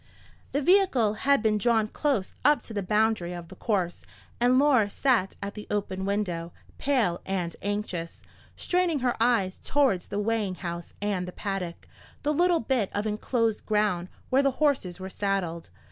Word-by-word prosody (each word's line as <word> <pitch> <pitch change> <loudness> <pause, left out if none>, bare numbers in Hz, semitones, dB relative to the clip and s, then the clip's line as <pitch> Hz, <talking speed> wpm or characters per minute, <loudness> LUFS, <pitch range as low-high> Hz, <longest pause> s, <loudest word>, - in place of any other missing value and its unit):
The 285 +1 0
vehicle 315 - +4 0.2
had 280 -5 +5
been 215 -1 +2
drawn 220 -1 +2
close 245 -5 -1
up 295 +2 +4
to 225 - -9
the 205 - -1
boundary 210 -2 +1
of 170 -1 -8
the - - -11
course, 190 -6 -1 0.4
and 245 +2 +4
Laura 260 -7 +4
sat 230 -4 +1
at 200 0 -4
the 210 - -9
open 190 -2 -2
window, 180 -5 -2 0.3
pale 235 -11 +1
and 180 -3 -2
anxious, 200 -5 -3 0.3
straining 355 -5 +1
her 245 -1 +1
eyes 225 -6 +2
towards 265 -11 +2
the 200 - -4
weighing 210 -2 0
house 170 -2 -6
and 195 -3 -1
the - - -5
paddock, 185 -3 -5 0.4
the 300 +1 +1
little 350 +2 +3
bit 230 -4 0
of 205 +1 -1
enclosed 220 +1 0
ground 210 -5 +1 0.2
where 265 +2 +5
the 275 -1 +2
horses 265 - +1
were 190 - -5
saddled. 190 -4 -2
210 Hz, 165 wpm, -27 LUFS, 185-255 Hz, 0.4 s, had